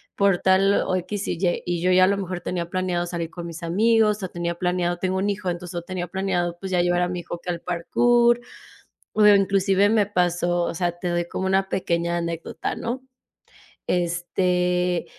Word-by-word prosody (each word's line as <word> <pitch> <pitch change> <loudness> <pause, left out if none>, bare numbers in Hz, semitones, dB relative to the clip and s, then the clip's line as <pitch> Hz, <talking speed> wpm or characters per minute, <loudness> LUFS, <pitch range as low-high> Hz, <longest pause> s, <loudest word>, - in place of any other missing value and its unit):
por 200 -3 +3
tal 190 +1 +4
o, 185 - 0
equis 190 +3 -3
y 170 - -2
ye, 175 -1 0
y 175 -1 -2
yo 185 - +2
ya 185 0 +6
a - - +2
lo 200 - +2
mejor 185 -2 -4
tenía 170 -1 -3
planeado 180 -1 -1
salir 170 -1 -4
con 175 -1 -8
mis 170 0 -8
amigos, 210 +3 +2
o 185 - -3
tenía 170 0 -3
planeado 180 0 0
tengo 185 +1 -1
un 200 +2 0
hijo, 200 -2 -2
entonces 175 0 -5
yo 170 - -3
tenía 180 -1 -4
planeado 175 -2 -1
pues 190 -1 -6
ya 180 -1 +3
llevar 175 0 +1
a 180 - +1
mi 180 - -3
hijo 175 - -6
aquí 175 +1 -9
al 170 -1 -2
Parcur. 240 +7 +2 0.8
O 210 -1 +5
inclusive 195 0 +4
me 215 -1 +3
pasó, 175 -2 +1
o - - -3
sea, 175 0 0
te 180 - -3
doy 175 0 -1
como 190 +2 -3
una 190 0 +1
pequeña 170 -1 0
anécdota, 170 -1 -4
¿no? 250 +3 -4 0.9
Este, 180 0 0
180 Hz, 200 wpm, -23 LUFS, 175-195 Hz, 0.9 s, ya